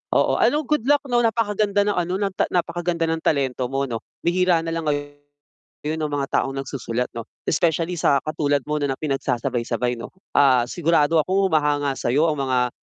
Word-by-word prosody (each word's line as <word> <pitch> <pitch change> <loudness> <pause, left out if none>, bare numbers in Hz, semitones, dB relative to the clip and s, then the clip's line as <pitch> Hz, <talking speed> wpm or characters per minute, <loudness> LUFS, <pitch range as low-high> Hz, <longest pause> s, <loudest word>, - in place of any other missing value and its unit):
Oo, - - +2
ano, 300 +1 +3
good 300 -6 +1
luck 290 0 +4
'no, 245 -2 +2
napakaganda 210 -2 +1
ng 205 - +2
ano, 175 0 0
ng 200 -2 -1 0.2
napakaganda 175 -1 0
ng 165 0 -1
talento 130 -3 0
mo 135 0 0
'no, 115 -2 -4 0.2
bihira 180 0 +3
na 165 - -3
lang 165 -2 -3
ngayon 145 +1 -6
ung 150 -1 -2
mga 140 -1 -1
taong 135 0 -4
nagsusulat 125 -2 -3
'no 115 - -5 0.2
especially 165 +2 +1
sa 140 -3 +3
katulad 145 -2 0
mo 150 - 0
na 145 -2 0
na - - -10
pinagsasabay-sabay 125 -3 -1
'no. - - -6 0.3
Ah, 130 -4 +5
sigurado 165 -1 +2
akong 190 +4 +1
humahanga 145 -2 +1
sa'yo 145 +7 +2
ang 150 - -4
mga 125 -2 +1
150 Hz, 180 wpm, -22 LUFS, 135-175 Hz, 0.3 s, Ah